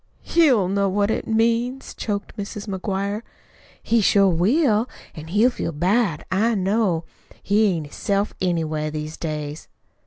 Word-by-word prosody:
"HE'LL 265 - +4
know 200 +1 +1
what 205 +2 +1
it - - -2
means," 235 +4 0
choked 205 -2 -4
Mrs. 205 0 -6
McGuire. 200 +2 -2 0.6
"He 230 0 +2
sure 200 -1 +4
will 220 - +2 0.2
an' 155 0 -9
he'll 210 +9 +3
feel 170 - -3
bad. 180 +1 +1
I 220 +5 +2
know 195 -3 +1 0.3
that. - - -20
He 210 +2 +3
ain't 165 -6 -1
hisself, 200 +7 -1
anyway, 160 -4 -1
these 155 +1 -5
days." 150 -1 -5
200 Hz, 145 wpm, -22 LUFS, 170-220 Hz, 0.6 s, HE'LL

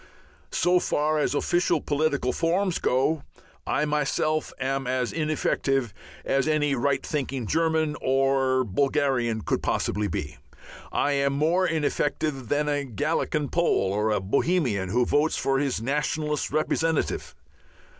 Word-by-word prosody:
_" - - -6
So 180 0 +3
far 155 -1 0
as 145 - 0
official 175 +4 +1
political 145 -4 0
forms 175 +2 0
go 135 +5 +1 0.5
I 150 - +1
myself 150 +1 0
am 135 0 -1
as 125 -1 -1
ineffective 135 -6 0 0.3
as 135 +1 +1
any 150 -2 +2
right 135 +1 0
thinking 135 -5 -3
German 160 +2 +1
or 135 -1 +2
Bulgarian 125 -1 0
could - - -1
possibly 105 0 -1
be. 75 -5 -4 0.5
I 145 - +1
am 140 -1 +1
more 165 +6 +2
ineffective 150 -3 -1
than 150 +1 +1
a 145 -1 0
Galician 145 +3 -1
Pole 170 - +1
or 105 +2 +1
a 105 - +1
Bohemian 110 - 0
who 120 +5 +2
votes 150 +5 +1
for 135 0 +1
his 135 -5 -1
nationalist 150 +2 -1
representative. 160 +2 -1
145 Hz, 135 wpm, -26 LUFS, 130-155 Hz, 0.5 s, So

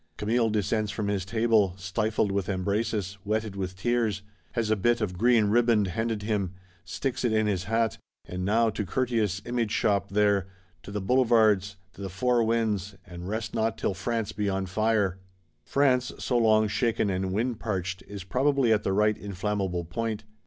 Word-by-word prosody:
Camille 115 +2 +1
descends 105 0 0
from 100 0 -2
his 100 -2 0
table, 110 -3 +2
"stifled 105 +2 0
with 100 0 -1
embraces, 100 +1 -1
wetted 110 -1 -2
with 95 -1 -4
tears;" 110 -1 0 0.3
has 115 -3 0
a - - +4
bit 120 +4 +2
of 100 -5 -2
green 115 +2 +4
riband 110 -2 +3
handed 115 +2 -2
him; 100 -4 -1 0.3
sticks 125 +10 -3
it 120 - +2
in 110 0 +2
his 95 -3 -1
hat. 115 +1 0 0.3
And 90 0 -5
now 110 +3 +3
to 105 - -3
Curtius' 105 -3 -1
Image 120 -2 -1
shop 100 -2 +1
there; 100 -2 +2 0.3
to - - -11
the 105 0 -3
Boulevards; 110 -4 +3 0.2
to - - -12
the 95 - -4
four 120 +6 +1
winds; 110 -4 0
and 90 +1 -8
rest 110 +1 -3
not 110 0 0
till 100 - -1
France 110 +3 -2
be 105 -1 -1
on 95 0 -1
fire! 100 -1 +1 0.4
France, 130 - +2
so 125 - -2
long 110 -2 +4
shaken 105 -1 0
and 95 0 -1
wind 115 +3 -1
parched, 95 -3 -3
is 100 -2 -7
probably 130 +3 +2
at 105 - +2
the 95 - -1
right 105 +1 +3
inflammable 100 -3 -3
point. 110 +5 -3
105 Hz, 175 wpm, -27 LUFS, 95-115 Hz, 0.4 s, a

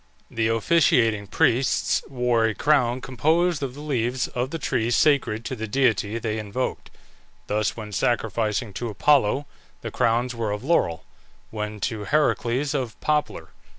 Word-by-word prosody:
The 115 -1 0
officiating 115 -4 +2
priests 130 +1 +1
wore 125 -3 +1
a 110 -2 0
crown 130 -3 +2
composed 160 +6 +1
of 135 -2 -4
the 145 - -9
leaves 125 -3 -1
of 125 +1 -2
the 165 - -4
tree 120 -6 -1
sacred 120 -4 +2
to 130 - -3
the 110 -1 -5
deity 110 -3 +1
they 110 -1 -3
invoked. 110 +5 -4 0.6
Thus 105 -1 -1
when 105 -2 -7
sacrificing 110 0 -1
to 120 - -2
Apollo 140 +3 +2 0.4
the - - -6
crowns 120 +2 +1
were 115 -3 -3
of 105 +2 -4
laurel; 135 - +1 0.5
when 105 -1 -5
to 105 +1 -3
Heracles, 140 -1 +1
of 125 -6 -3
poplar. 150 -1 -1
120 Hz, 150 wpm, -24 LUFS, 110-135 Hz, 0.6 s, officiating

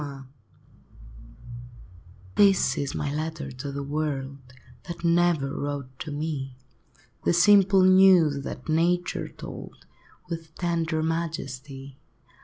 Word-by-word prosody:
JT 140 -2 -7 2.1
This 195 -2 +4
is 140 -1 -3
my 145 -1 -2
letter 155 -2 -4
to 135 +3 -6
the 140 0 -4
world, 140 -2 -3 0.5
That 170 0 -8
never 170 -5 +2
wrote 140 -3 -5
to 155 - -6
me, 145 -3 -4 0.7
The - - +2
simple 195 +1 +5
news 185 -7 +5
that 125 - -7
Nature 175 +3 0
told, - - -10 0.4
With 165 -2 -7
tender 165 -2 -1
majesty. 140 -5 -5
155 Hz, 105 wpm, -26 LUFS, 140-170 Hz, 2.1 s, simple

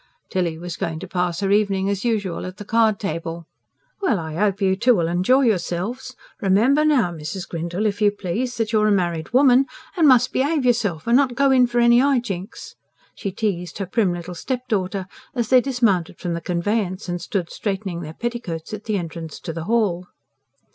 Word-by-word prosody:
Tilly 175 -4 -1
was 175 0 -6
going 160 -1 -3
to 190 - -6
pass 180 -1 -1
her 195 -1 0
evening, 200 -2 +2
as 200 -1 -1
usual, 205 -7 -1
at 185 - -9
the 205 - -8
card 220 -1 +2
table. 165 -2 -4 0.6
"Well, 260 - +2
I 160 -2 -5
hope 200 +3 0
you 190 -2 +2
two'll 215 -6 +3
enjoy 185 +11 +3
yourselves. 230 +3 -1 0.3
Remember 225 +10 +3
now, 265 - +3
Mrs. 170 +3 -6
Grindle, 170 +5 -3
if 205 0 -1
you 210 - +6
please, 205 +5 -3
that 225 -1 -1
you're 215 -1 +3
a - - +3
married 175 -5 0
woman 260 0 +5 0.3
and 330 -4 +4
must 250 -1 +5
behave 285 +1 +1
yourself, 210 -10 +1
and 235 - +3
not 260 -2 +3
go 275 +2 +3
in 255 -2 +5
for 240 0 -3
any 235 0 +6
high 275 +1 +3
jinks," 195 -6 -5 0.4
she 195 - -5
teased 180 -4 -3
her 195 - -3
prim 195 0 +1
little 175 0 -5
stepdaughter, 200 -3 -2 0.3
as 235 -3 -1
they 255 -1 +6
dismounted 230 -11 0
from 175 -2 -3
the 170 - -3
conveyance 185 +3 -1
and 175 -1 -3
stood 175 -1 -3
straightening 190 -4 -3
their 155 -1 -8
petticoats 230 -9 -5
at 215 0 -6
the 215 -2 0
entrance 165 -3 -6
to 165 - -6
the 165 0 -5
hall. 200 -6 0
200 Hz, 195 wpm, -22 LUFS, 175-240 Hz, 0.6 s, you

